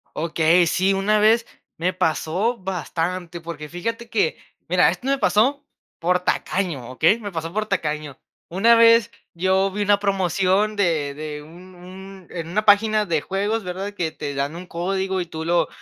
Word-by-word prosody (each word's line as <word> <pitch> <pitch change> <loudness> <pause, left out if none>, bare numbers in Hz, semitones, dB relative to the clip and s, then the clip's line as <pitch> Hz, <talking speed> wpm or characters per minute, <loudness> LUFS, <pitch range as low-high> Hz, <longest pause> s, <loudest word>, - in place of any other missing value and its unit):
Okey, 165 +2 +3
sí, 190 +4 +2
una 205 +2 +2
vez 225 +2 +4 0.3
me 180 +3 0
pasó 185 +7 0
bastante. 180 -2 -4
Porque 155 -2 -7
fíjate 230 +7 -5
que, 205 -9 0 0.3
mira, 180 +1 +4
esto 180 +9 -5
me 275 0 +2
pasó 270 +5 +2 0.3
por 180 +2 +1
tacaño, 175 -9 -2
¿okey? 165 - +3
Me 205 -3 -6
pasó 165 -1 -4
por 215 +1 -1
tacaño. 150 -8 -3 0.3
Una 220 +7 +4
vez, 230 0 +5 0.2
yo 190 +3 +1
vi 205 +2 -3
una 205 0 +3
promoción 195 +1 +1
de 160 -7 0
de 150 0 -6
un 175 +5 -14
un 190 +1 -12
en 165 -2 -6
una 215 +5 -1
página 215 +1 +4
de 165 -5 0
juegos, 205 +5 -2
¿verdad? 190 +3 -5
Que 170 -5 -2
te 145 -2 -5
dan 140 +3 -2
un 180 +1 -9
código, 190 +2 -2
y - - -3
tú 160 -1 -7
lo 170 -1 +2
185 Hz, 170 wpm, -22 LUFS, 165-205 Hz, 0.3 s, vez